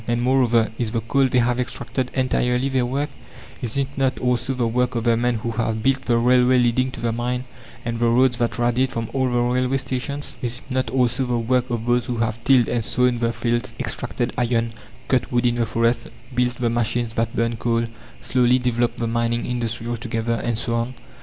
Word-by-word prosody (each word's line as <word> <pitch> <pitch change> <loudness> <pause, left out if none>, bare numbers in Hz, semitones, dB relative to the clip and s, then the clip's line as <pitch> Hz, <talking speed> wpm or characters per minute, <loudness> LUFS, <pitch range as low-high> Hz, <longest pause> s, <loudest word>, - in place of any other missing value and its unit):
And, 120 0 +1
moreover, 120 -3 +3
Is 120 -3 0
the 115 +1 -1
coal 135 +4 +2
they 125 - 0
have 120 0 +2
extracted 125 +1 -3
entirely 130 0 +1
their 130 -2 +1
work? 140 +4 -2 0.5
Is 120 +1 -2
it 135 -1 +1
not 135 -1 +1
also 125 +1 0
the 125 -2 0
work 125 +2 0
of 115 - -1
the 115 -1 +3
men 120 +1 +1
who 115 +1 -3
have 110 -1 -1
built 135 +1 +1
the 120 -1 +3
railway 125 +1 +4
leading 125 +1 +2
to - - -7
the 115 -1 0
mine 125 +2 -2 0.4
and 115 0 -2
the 120 - +3
roads 120 +1 +3
that 120 0 -1
radiate 120 +2 +1
from 115 -1 -4
all 130 -1 +1
the 120 - 0
railway 125 +2 +1
stations? 135 +2 -4
Is 120 +1 -2
it 140 - -14
not 130 -2 0
also 125 +1 +1
the 120 -1 0
work 125 +2 +1
of 115 -2 -2
those 120 0 +1
that 120 - -2
have 115 0 -2
tilled 130 -2 +5
and 120 -2 0
sown 125 +2 +2
the 115 0 +1
fields, 120 0 -2
extracted 120 0 -3
iron, 115 -1 0 0.3
cut 130 +1 +1
wood 120 0 +1
in 120 - +3
the 115 -1 +1
forests, 115 +2 +1 0.3
built 125 0 +1
the 120 -2 0
machines 120 0 -1
that 115 0 -1
burn 115 0 0
coal, 115 0 0 0.4
slowly 125 0 +3
developed 120 -1 0
the 115 - -1
mining 115 +1 0
industry 120 -2 -2
altogether, 115 -1 -2
and 115 0 -1
so 115 +1 -1
on? 115 +2 -1
120 Hz, 215 wpm, -22 LUFS, 115-125 Hz, 0.5 s, tilled